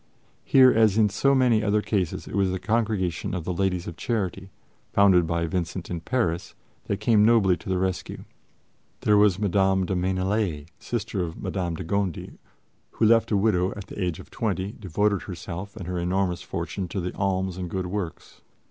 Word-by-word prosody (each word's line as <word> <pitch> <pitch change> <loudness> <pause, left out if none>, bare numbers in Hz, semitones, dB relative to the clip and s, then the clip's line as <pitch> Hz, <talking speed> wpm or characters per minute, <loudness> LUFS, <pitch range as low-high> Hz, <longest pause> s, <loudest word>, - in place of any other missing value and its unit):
Here, 130 -1 +6
as 110 -2 +3
in 110 -2 +4
so 135 +8 +2
many 125 -4 +3
other 105 0 +1
cases, 95 -6 -2
it - - -9
was 100 -1 +2
the 95 - -1
Congregation 105 -5 -1
of 90 - -3
the 90 - -2
Ladies 90 -1 -1
of 85 - -7
Charity, 95 -4 -2 0.4
founded 95 -4 +5
by 85 0 0
Vincent 85 +1 -3
in 85 -2 -3
Paris, 90 -7 -1 0.3
that 100 - -2
came 110 0 +4
nobly 105 -5 +4
to 80 - -10
his 95 - +1
rescue. 95 0 -3 0.8
There 105 - +3
was 105 -3 +4
Madame 95 -1 +2
de 95 - -2
Maignelais, 95 -3 -1
sister 105 -5 -3
of 85 -1 -6
M. 90 -3 -2
de 95 - -5
Gondi, 95 0 -3 0.5
who, 115 - +1
left 115 +1 +4
a 105 - +2
widow 95 -3 +2
at 105 -2 -7
the 100 - -5
age 90 -3 -2
of - - -13
twenty, 95 +2 -2
devoted 100 -1 -1
herself 90 +2 -7
and 100 -5 -7
her 90 0 -3
enormous 90 0 0
fortune 95 -2 -4
to 90 0 -3
alms 95 -2 -1
and 90 -2 -4
good 95 +1 -3
works. 90 -3 -6
95 Hz, 185 wpm, -25 LUFS, 90-105 Hz, 0.8 s, Here